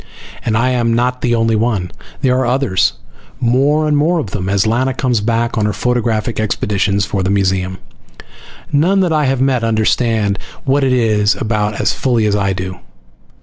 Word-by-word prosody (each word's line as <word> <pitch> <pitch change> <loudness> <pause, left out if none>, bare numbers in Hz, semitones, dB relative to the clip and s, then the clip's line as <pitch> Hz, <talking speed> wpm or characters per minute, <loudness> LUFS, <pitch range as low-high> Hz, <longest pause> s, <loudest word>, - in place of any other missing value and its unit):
And 110 -1 0
I 125 +3 +1
am 115 -2 +1
not 125 +1 0
the 120 -1 +1
only 115 -1 +1
one! 105 -5 -1 0.3
There 125 -1 +3
are 130 - 0
others. 125 -7 +1 0.5
More 140 +6 +2
and 150 - +2
more 160 +5 +2
of 115 - -3
them, 95 -2 -3
as 100 +2 +1
Lana 125 +4 0
comes 125 -5 0
back 115 +1 0
on 105 - +1
her 105 - -1
photographic 115 0 -1
expeditions 100 -2 0
for 100 0 -2
the 95 - -1
museum. 95 -2 0 0.9
None 180 +7 +3
that 175 -3 +1
I 150 -1 +2
have 130 -1 0
met 130 -3 +1
understand 110 -2 +1 0.3
what 140 +1 +2
it 130 - +2
is 110 -4 +2
about 105 -2 -2
as - - +1
fully 120 -4 0
as 105 -1 +1
I 100 -1 0
do. 95 -1 -5
115 Hz, 185 wpm, -16 LUFS, 105-130 Hz, 0.9 s, There